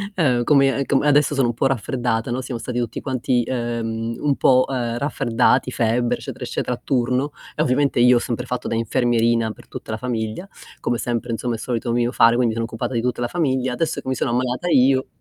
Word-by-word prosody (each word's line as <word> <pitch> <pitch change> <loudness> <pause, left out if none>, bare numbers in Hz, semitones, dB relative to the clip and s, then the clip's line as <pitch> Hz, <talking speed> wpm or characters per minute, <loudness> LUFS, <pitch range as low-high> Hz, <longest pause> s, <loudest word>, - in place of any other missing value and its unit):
ehm, 125 -8 +2
come 135 0 +4
a - - -1
com 135 - +2
adesso 145 0 +3
sono 135 -3 +2
un 120 - -1
po' 130 - 0
raffreddata, 120 -2 -1
no, 125 +2 -2
siamo 125 -2 -5
stati 125 0 -5
tutti 120 -1 -3
quanti, 130 -2 0
ehm, 115 -2 -3
un 145 -2 +1
po', 130 -1 +4
ehm, 120 -3 -2
raffreddati, 125 -3 +1
febbre 120 +1 +1
eccetera, - - -8
eccetera 125 - -2
a - - -26
turno 130 +2 0 0.2
e - - -1
ovviamente 140 -2 +1
io 125 0 +6
ho - - +2
sempre 120 +1 -3
fatto 125 -1 -4
da - - -1
infermierina 115 0 +1
per - - -14
tutta - - -9
la 110 - -2
famiglia, 115 - -4 0.3
come 120 - -1
sempre 120 0 -2
insomma 120 +1 -2
è - - -5
solito 120 0 -3
mio 120 0 +1
fare, 115 0 +5
quindi 120 -2 +2
sono 115 0 -2
occupata 115 +3 -4
di 115 - 0
tutta 120 0 -2
la 120 - 0
famiglia. 130 -5 0
Adesso 160 +4 -2
che - - -14
mi 130 - 0
sono - - -1
ammalata 125 +6 -1
io, 130 -2 +3
125 Hz, 220 wpm, -21 LUFS, 115-130 Hz, 0.3 s, io